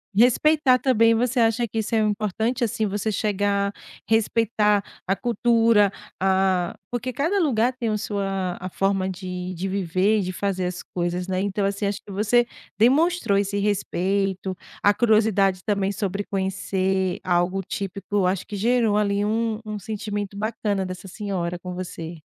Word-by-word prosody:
Respeitar 255 +4 +4
também. 230 -4 +4
Você 245 +2 +1
acha 230 +1 +2
que 225 +1 -3
isso 220 - -3
é 225 - +4
importante, 215 +3 0
assim, 220 -1 0
você 205 +2 -2
chegar, 200 -1 0 0.4
respeitar 220 -2 +2 0.2
a 195 - +2
cultura, 230 -1 +3 0.3
a 190 -2 +1 0.2
porque 250 +1 -3
cada 330 +9 +1
lugar 250 - +2
tem 235 -3 -1
a 215 - 0
sua 195 -3 -2
a 185 - -5
forma 195 0 0
de 180 -1 -5
de 180 +2 -3
viver 190 +2 +1
e - - +1
de 185 0 -4
fazer 190 -1 -1
as 180 0 -4
coisas, 175 +1 -3
né. 185 -1 -1
Então, 200 +1 -1
assim, 200 +1 -1
acho 200 0 -1
que 200 - -11
você 225 +4 +2 0.3
demonstrou 265 - +3
esse 200 0 0
respeito, 195 -1 -1 0.2
a 205 - +5
curiosidade 210 -4 +3
também 200 -2 0
sobre 200 0 -2
conhecer 190 -1 -1
algo 180 +2 +1
típico, 195 +1 -2
acho 185 0 -1
que 210 - -6
gerou 225 0 +2
ali 200 -1 +1
um 220 +1 0
um 215 -1 -5
sentimento 205 -1 -4
bacana 210 -2 -1
dessa 185 +1 -7
senhora 180 -3 -3
com 180 -1 -6
você. 170 -2 -6
200 Hz, 160 wpm, -24 LUFS, 190-220 Hz, 0.4 s, a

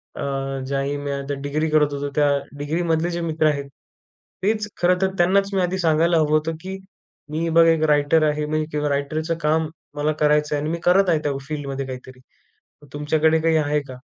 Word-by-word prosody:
अ, 135 -1 -3
ज्याही 140 +1 -1
मी 145 0 -4
आता 140 0 -3
डिग्री 150 +3 -1
करत 150 -1 +3
होतो. 140 0 -3
त्या 145 -1 +3 0.3
डिग्रीमधले 165 +3 0
जे 170 0 -3
मित्र 155 0 +2
आहेत, 140 -2 -1 0.7
तेच 215 +1 0
खरं 180 +1 +4
तर 190 0 +1
त्यांनाच 195 +3 +3
मी 190 - +2
आधी 180 +1 0
सांगायला 165 0 +3
हवं 155 -2 +2
होतं 160 +1 -3
की 190 +1 -5 0.5
मी 160 +2 -1
बघा, 165 0 +5
1 160 -1 +1
रायटर 145 +2 +3
आहे 150 0 -2
मी 155 +1 -1
किंवा 150 0 -1
रायटरचं 155 +4 -1
काम 155 +1 +1 0.3
मला 150 +1 0
करायचं 150 0 +3
आहे. 145 - -1
आणि 150 - -2
मी 170 - -3
करत 185 +1 +4
आहे 160 -3 +3
त्या 145 - 0
फील्डमध्ये 140 -2 -4
काहीतरी. 130 0 -9 0.7
तुमच्याकडे 155 +2 +2
काही 165 0 +3
आहे 150 -1 +1
का? 130 - -9
155 Hz, 190 wpm, -22 LUFS, 145-165 Hz, 0.7 s, बघा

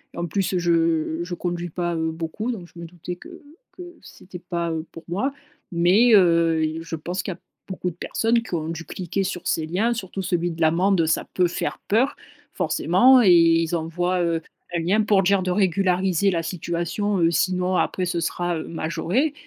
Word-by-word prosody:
En 170 - -2
plus, 190 +3 -1
heu, 180 - +1
je 165 -1 +1
je 175 0 -6
conduis 175 0 -3
pas, 175 +1 -2
heu, 160 0 0
beaucoup, 165 +9 -4
donc 180 -6 -8
je 170 - -12
me 170 - -7
doutais 175 +1 -8
que 350 - -13 0.3
que 360 - -9 0.2
c'était 180 -1 -12
pas, 170 -1 -3
heu, 160 0 -3
pour 165 - -10
moi. 260 +11 -1 0.4
Mais, 190 +8 +4
heu, 165 -4 +4
il 155 +1 -2
je 165 - -5
pense 175 +4 -4
qu'il 190 - -4
y - - -13
a - - -24 0.3
beaucoup 185 -1 -3
de - - -16
personnes 230 +4 0
qui 205 -6 -5
ont 160 0 -3
dû 165 0 -5
cliquer 190 +2 -3
sur 185 -2 -4
ces 160 - 0
liens. 200 +9 0
Surtout 195 -3 -5
celui 175 -1 -1
de 165 0 -8
l'amende, 170 +2 +3
ça 160 - 0
peut 180 -1 +3
faire - - -3
peur, 245 +7 +2 0.4
forcément. 255 0 +4
Et 185 -5 +6
ils 165 0 +4
envoient, 175 +2 -1
heu, 165 -1 0 0.3
un 170 - 0
lien 190 +6 +2
pour 205 -2 +3
dire 195 0 +2
de 185 - -1
régulariser 190 0 +2
la 165 -1 -1
situation, 175 +4 -2
heu, 165 0 +4
sinon 185 +1 +1
après 180 0 0
ce 170 -1 -2
sera, 175 +1 -1
heu, - - -6
majoré. 170 - -1
175 Hz, 205 wpm, -23 LUFS, 165-195 Hz, 0.4 s, Et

